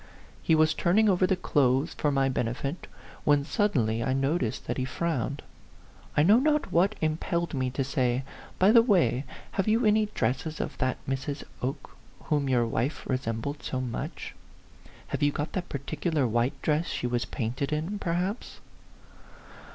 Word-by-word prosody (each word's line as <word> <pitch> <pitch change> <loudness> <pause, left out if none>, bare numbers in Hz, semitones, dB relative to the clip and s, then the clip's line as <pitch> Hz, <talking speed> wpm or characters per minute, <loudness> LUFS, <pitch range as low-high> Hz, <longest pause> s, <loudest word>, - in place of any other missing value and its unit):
He 160 - +3
was 155 0 +4
turning 210 +5 +3
over 185 -2 +3
the 190 - +2
clothes 135 -2 +1
for 150 - 0
my 135 -1 +2
benefit, 130 +5 -2 0.4
when 145 -1 +3
suddenly 125 - +1
I 130 - 0
noticed 135 -3 -1
that 120 - -2
he - - 0
frowned. 145 0 -2 0.7
I 150 - +6
know 205 +8 +6
not 300 +2 +1
what 190 +5 +3
impelled 165 +2 -1
me 130 -2 0
to 135 +2 -1
say, 130 -2 0 0.2
" - - -19
By 190 +3 +5
the 230 0 +8
way, 160 - +2 0.3
have 195 - -1
you 225 +2 +3
any 215 0 +4
dresses 145 - -2
of - - -3
that 130 -2 0
Mrs. 135 +2 -3 0.2
Oke 135 +2 -4 0.3
whom 145 -3 0
your 120 -2 +3
wife 120 +5 -2
resembles 130 +2 -2
so 130 - -3
much? 125 -3 -5 0.8
Have - - -3
you 145 0 +4
got 145 +2 -4
that 180 -2 -3
particular 145 +2 -1
white 120 +3 0
dress 155 +2 +1
she - - -3
was 120 -1 0
painted 125 +4 -3
in, 165 +7 -2
perhaps 180 +5 -2
145 Hz, 165 wpm, -28 LUFS, 130-175 Hz, 0.8 s, the